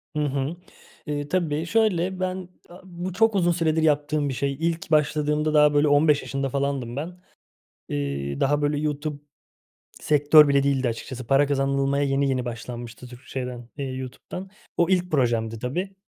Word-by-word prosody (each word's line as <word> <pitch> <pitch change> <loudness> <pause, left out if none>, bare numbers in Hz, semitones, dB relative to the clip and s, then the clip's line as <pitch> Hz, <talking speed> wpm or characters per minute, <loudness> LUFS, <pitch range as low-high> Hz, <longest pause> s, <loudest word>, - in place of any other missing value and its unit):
Hı - - 0
hı. 140 +3 -2 0.5
Eee, 145 -1 -3
tabii 160 -2 -1
şöyle, 190 -2 +1
ben 185 -1 -3 0.2
a 175 +1 -13
bu 180 0 -6
çok 225 +2 +3
uzun 175 -3 +3
süredir 160 -2 +1
yaptığım 150 -1 +1
bir 130 - -2
şey. 140 +2 -1
İlk 165 0 -2
başladığımda 150 0 +2
daha 150 -1 +5
böyle 145 +1 +4
15 145 0 +4
yaşında 135 0 -3
falandım 135 -3 -2
ben. 155 +6 -4 0.8
Eee, 70 -1 -3
daha 145 +2 +2
böyle 145 0 +1
YouTube 150 0 -3 0.8
sektör 150 +1 +6
bile 140 -1 +3
değildi 135 -2 +1
açıkçası. 120 +1 -5
Para 140 +2 +4
kazanılmaya 140 0 +1
yeni 140 0 +1
yeni 130 -2 -1
başlanmıştı 120 +1 -7
Türk 125 0 -13
şeyden, 125 -2 -6
eee, 140 - -3
YouTube'dan. 130 +8 -7 0.3
O 170 0 +3
ilk 180 -1 +1
projemdi 115 -5 0
tabii. 180 - -3
145 Hz, 160 wpm, -24 LUFS, 135-160 Hz, 0.8 s, sektör